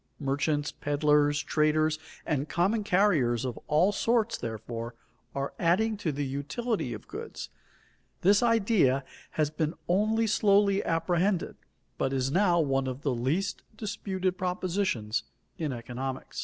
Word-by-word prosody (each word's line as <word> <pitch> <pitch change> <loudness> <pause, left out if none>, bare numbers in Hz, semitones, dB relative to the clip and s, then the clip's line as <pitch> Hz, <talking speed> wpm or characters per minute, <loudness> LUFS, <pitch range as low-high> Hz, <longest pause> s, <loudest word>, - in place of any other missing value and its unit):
Merchants, 145 +1 0
peddlers, 145 0 +2
traders, 155 0 +2 0.3
and 150 -2 -1
common 200 +5 +1
carriers 165 - +2
of 125 -3 -4
all 165 +7 +4
sorts, 230 +2 +1
therefore, 115 +1 -5 0.4
are 140 0 -2
adding 215 +6 +2
to 180 -6 -1
the 145 0 -2
utility 140 - -2
of 105 -3 -7
goods. - - -7 0.7
This 200 +2 +5
idea 210 - +3 0.3
has 150 -1 +2
been 155 0 -1
only 215 +5 +2
slowly 200 -2 +3
apprehended, 175 +3 0 0.4
but 135 - 0
is 135 0 0
now 180 0 +3
one 135 -3 +1
of 130 +3 -5
the 140 - +1
least 150 +11 -1 0.2
disputed 190 -3 -2
propositions 180 - -1 0.4
in 155 -4 -1
economics. 130 +2 -5
155 Hz, 130 wpm, -28 LUFS, 135-195 Hz, 0.7 s, This